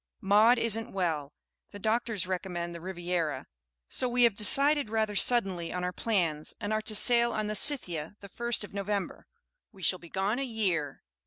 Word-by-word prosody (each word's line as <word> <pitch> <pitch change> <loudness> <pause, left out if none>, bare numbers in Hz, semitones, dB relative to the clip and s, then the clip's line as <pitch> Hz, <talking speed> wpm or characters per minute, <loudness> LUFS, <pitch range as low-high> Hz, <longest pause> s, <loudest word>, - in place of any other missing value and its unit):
"Maud 215 +5 +4
isn't 225 0 0
well, 160 -7 -2 0.4
the 205 - -11
doctors 220 -1 -1
recommend 180 -2 -4
the 170 - -9
Riviera, 175 -6 -3 0.4
so 255 - -1
we 245 0 +2
have 235 -3 +4
decided 275 +6 +3
rather 220 -1 -1
suddenly 195 -7 +2
on 180 0 -4
our 180 0 -3
plans, 170 -10 -2
and 205 +1 -3
are 215 - -1
to 215 0 -1
sail 235 +2 +4
on 215 - -2
the 210 - -3
'Scythia' 190 - +3
the 200 - -11
first 235 +3 -1
of 205 - -10
November. 200 -1 -4 0.4
We 195 -4 -14
shall 185 +2 +2
be 170 - -14
gone 195 +7 -2
a - - -2
year." 190 - -2
200 Hz, 180 wpm, -28 LUFS, 180-225 Hz, 0.4 s, Maud